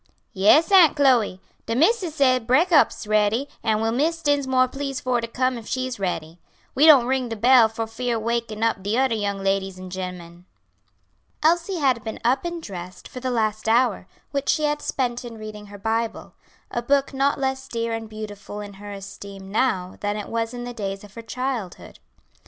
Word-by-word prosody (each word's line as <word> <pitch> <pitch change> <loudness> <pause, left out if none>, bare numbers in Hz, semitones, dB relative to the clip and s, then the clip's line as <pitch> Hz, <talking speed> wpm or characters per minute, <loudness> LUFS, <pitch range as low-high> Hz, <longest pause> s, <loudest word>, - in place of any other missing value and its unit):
"Yes, 215 - +5
Aunt 360 -7 +7
Chloe; 250 -10 +3 0.3
de 230 - -1
missis 345 - +2
say 255 -4 +4
breakop's 295 +8 +3
is - - -8
ready, 215 +5 +2
an' 220 -2 +1
will 225 0 +1
Miss 325 +7 0
Dinsmore 265 -3 +2
please 275 0 -4
for 250 -2 0
to 230 - -4
come 255 +1 -1
if 220 - -12
she's 255 -3 -3
ready. 170 -3 -3 0.3
We 295 +4 +5
don't 275 -6 +8
ring 260 -1 0
de 225 - -3
bell 240 +1 +6
fear 225 +2 -3
wakin' 225 -1 -2
up 225 -3 +1
de 205 +4 -1
odder 260 -2 +2
young 200 -2 -2
ladies 195 -1 0
an' 185 0 -9
gemmen." 180 -2 -7 1.0
Elsie 340 +4 +2
had 260 -7 +1
been 220 0 -5
up 260 +6 +2
and 345 -1 -4
dressed 185 - -8
for 255 - -8
the 255 0 -3
last 220 -2 -1
hour, 230 -5 +2 0.2
which 280 -1 -2
she 310 - +2
had 295 0 0
spent 245 -2 -2
in 235 -2 -8
reading 215 -1 -9
her 205 0 -10
Bible; 225 +2 -2 0.4
a 240 - -2
book 275 +3 +1
not 275 +1 +1
less 265 0 -2
dear 230 0 -2
and 225 -1 -5
beautiful 210 -1 -8
in 205 -1 -8
her 205 0 -8
esteem 195 0 -9
now 190 -6 0
than 205 0 -2
it 210 - -6
was 230 0 -2
in 245 -1 -6
the 245 0 -6
days 195 -3 -5
of 205 -1 -14
her 230 - -8
childhood. 235 -4 -5
230 Hz, 190 wpm, -23 LUFS, 205-265 Hz, 1.0 s, don't